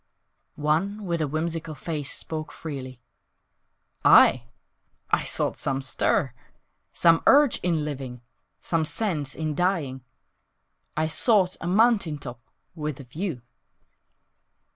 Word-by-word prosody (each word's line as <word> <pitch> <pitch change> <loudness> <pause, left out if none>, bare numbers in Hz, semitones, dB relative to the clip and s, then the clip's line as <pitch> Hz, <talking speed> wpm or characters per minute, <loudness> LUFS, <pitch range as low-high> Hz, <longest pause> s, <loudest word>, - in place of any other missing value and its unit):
One 170 +8 -1
with 170 -2 -1
a 155 - 0
whimsical 160 +1 -3
face 150 -1 -3
spoke 155 -1 -2
freely; 130 -5 -7 1.0
"I? 125 -1 +6 0.7
I - - +3
sought - - -2
some 135 0 -2
stir, 130 -1 +1 0.6
Some 165 -1 +4
urge 285 -2 +5
in 165 -4 0
living, 130 -4 -6 0.4
Some 165 -2 0
sense 155 -6 -2
in 155 -1 -2
dying. 150 -7 -1 0.9
I 155 - +2
sought 185 +3 +2
a 170 - -4
mountain 200 -5 +3
top 120 -4 -9 0.3
With 150 -4 -5
a - - -8
view!" 145 - -5
155 Hz, 115 wpm, -25 LUFS, 140-175 Hz, 1.0 s, I